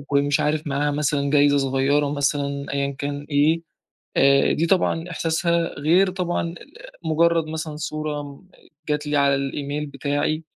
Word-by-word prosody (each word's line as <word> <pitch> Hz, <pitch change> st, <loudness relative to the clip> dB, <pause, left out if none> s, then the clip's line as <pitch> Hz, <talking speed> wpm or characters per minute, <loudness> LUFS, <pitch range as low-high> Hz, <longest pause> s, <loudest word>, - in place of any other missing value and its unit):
كان 140 Hz, -, +4 dB
مش 145 Hz, 0 st, +1 dB
عارف 150 Hz, +1 st, 0 dB
معاها 145 Hz, +1 st, 0 dB
مثلًا 145 Hz, -1 st, 0 dB
جايْزة 145 Hz, 0 st, +4 dB
صغيرة 135 Hz, +2 st, +1 dB
مثلًا، 140 Hz, 0 st, -1 dB
أيًّا 140 Hz, 0 st, 0 dB
كان 145 Hz, 0 st, -4 dB
إيه، 150 Hz, +3 st, +3 dB, 0.6 s
آآ 140 Hz, 0 st, +4 dB
دي 165 Hz, -, 0 dB
طبعًا 175 Hz, -1 st, +1 dB
إحْساسها 170 Hz, 0 st, 0 dB
غير 180 Hz, +6 st, +4 dB
طبعًا 175 Hz, -2 st, -2 dB, 0.5 s
مجرد 165 Hz, 0 st, +2 dB
مثلًا 155 Hz, -1 st, -5 dB
صورة 150 Hz, -1 st, -5 dB, 0.5 s
جات 150 Hz, 0 st, -1 dB
لي 150 Hz, -, 0 dB
على 140 Hz, -1 st, +4 dB
الإيميل 140 Hz, +2 st, -3 dB
بتاعي، 145 Hz, +3 st, -2 dB
145 Hz, 140 wpm, -23 LUFS, 140-160 Hz, 0.6 s, كان